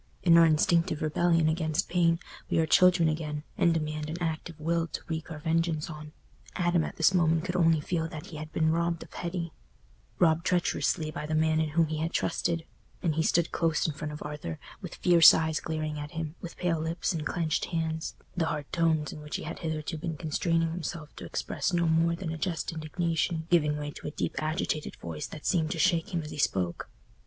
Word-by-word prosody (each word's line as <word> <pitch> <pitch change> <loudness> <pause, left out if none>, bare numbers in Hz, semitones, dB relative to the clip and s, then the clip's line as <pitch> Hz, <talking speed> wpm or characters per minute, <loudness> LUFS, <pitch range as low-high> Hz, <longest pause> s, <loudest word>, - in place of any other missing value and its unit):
In 170 -2 +6
our 165 0 +8
instinctive 160 +1 +2
rebellion 165 +1 +2
against 155 -1 0
pain, 170 -2 +2 0.3
we - - +1
are 160 - +4
children 180 0 +5
again, 155 -1 -2
and 170 - +3
demand 155 -1 -2
an 160 - -4
active 165 -1 -3
will 165 +1 0
to - - -5
wreak 160 -1 -4
our 160 - -6
vengeance 165 0 0
on. 150 0 -9 0.4
Adam 175 -2 +2
at - - -5
this 165 +3 +4
moment 165 -2 +3
could 180 -1 -3
only 165 -3 +4
feel 160 +2 -1
that 155 -2 -8
he 155 - -9
had 155 +1 -7
been 160 0 +2
robbed 170 0 0
of - - -17
Hetty—robbed 170 - -2
treacherously 155 -3 +1
by 150 0 -5
the 155 - -1
man 155 0 +3
in 160 -1 +1
whom 165 +2 +3
he 155 0 -3
had 165 +2 -1
trusted—and 165 0 -2
he 160 - +1
stood 165 +1 +2
close 165 -1 +1
in 160 - 0
front 150 +1 -5
of 150 - -7
Arthur, 150 - -5 0.2
with - - -7
fierce 170 -2 +8
eyes 160 -1 0
glaring 155 -2 -3
at 145 0 -5
him, 160 -2 -4
with 170 - -8
pale 170 -3 0
lips 165 +3 -1
and 160 -2 -3
clenched 160 0 -1
hands, 160 -1 -2 0.2
the 165 -3 +1
hard 150 -2 -2
tones 160 -3 +1
in 150 - -9
which 150 0 -6
he - - -3
had 170 - -6
hitherto 160 0 -3
been 160 0 -4
constraining 165 +1 0
himself 165 -2 -5
to - - -8
express - - -2
no 170 -1 +2
more 165 +1 +3
than 170 -2 -4
a 160 - -5
just 170 +1 -2
indignation 165 +1 -1
giving 150 -3 +3
way 145 0 -4
to - - -8
a 150 - -7
deep - - -1
agitated 155 0 -2
voice 80 -3 -6
that 155 - -10
seemed 160 -4 +2
to 165 - -3
shake 170 +5 +2
him 170 -3 -1
as 150 - -8
he - - -7
spoke. 90 -10 0
160 Hz, 210 wpm, -29 LUFS, 155-170 Hz, 0.4 s, our